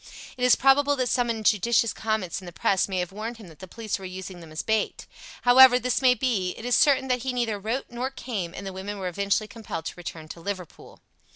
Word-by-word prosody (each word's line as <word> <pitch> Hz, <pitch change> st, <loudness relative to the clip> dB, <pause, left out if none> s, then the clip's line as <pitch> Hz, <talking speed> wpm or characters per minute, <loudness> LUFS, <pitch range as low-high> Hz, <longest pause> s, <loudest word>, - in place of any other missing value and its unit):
It 250 Hz, -, -5 dB
is 250 Hz, -, +6 dB
probable 285 Hz, +2 st, +4 dB
that 255 Hz, -2 st, -1 dB
some 245 Hz, -1 st, +1 dB
injudicious 225 Hz, +1 st, +2 dB
comments 215 Hz, -5 st, -2 dB
in 185 Hz, -, -11 dB
the -, -, -7 dB
Press 190 Hz, +3 st, +1 dB
may 190 Hz, -, -2 dB
have 180 Hz, 0 st, -2 dB
warned 220 Hz, +4 st, -6 dB
him 210 Hz, -6 st, -12 dB
that 155 Hz, -2 st, -16 dB
the 185 Hz, -, -9 dB
police 215 Hz, +1 st, -4 dB
were -, -, -11 dB
using 185 Hz, 0 st, -7 dB
them 165 Hz, -2 st, -12 dB
as 155 Hz, -, -4 dB
a -, -, -20 dB
bait. 220 Hz, -1 st, -1 dB, 0.4 s
However, 250 Hz, 0 st, +8 dB
this 250 Hz, 0 st, -1 dB
may 255 Hz, -1 st, +5 dB
be, 215 Hz, -9 st, -1 dB
it 225 Hz, -, -8 dB
is 245 Hz, -, +2 dB
certain 270 Hz, -2 st, +4 dB
that 250 Hz, 0 st, +2 dB
he 260 Hz, +1 st, -2 dB
neither 230 Hz, -4 st, -1 dB
wrote 225 Hz, +6 st, -2 dB
nor 245 Hz, +2 st, -3 dB
came, 200 Hz, -10 st, -5 dB
and 200 Hz, -, -7 dB
the 195 Hz, -, -5 dB
women 200 Hz, +2 st, -6 dB
were 190 Hz, -2 st, -4 dB
eventually 200 Hz, +4 st, 0 dB
compelled 210 Hz, -8 st, -7 dB
to -, -, -4 dB
return 165 Hz, -2 st, -8 dB
to 170 Hz, -, -9 dB
Liverpool. 185 Hz, -2 st, -7 dB
215 Hz, 245 wpm, -25 LUFS, 185-245 Hz, 0.4 s, However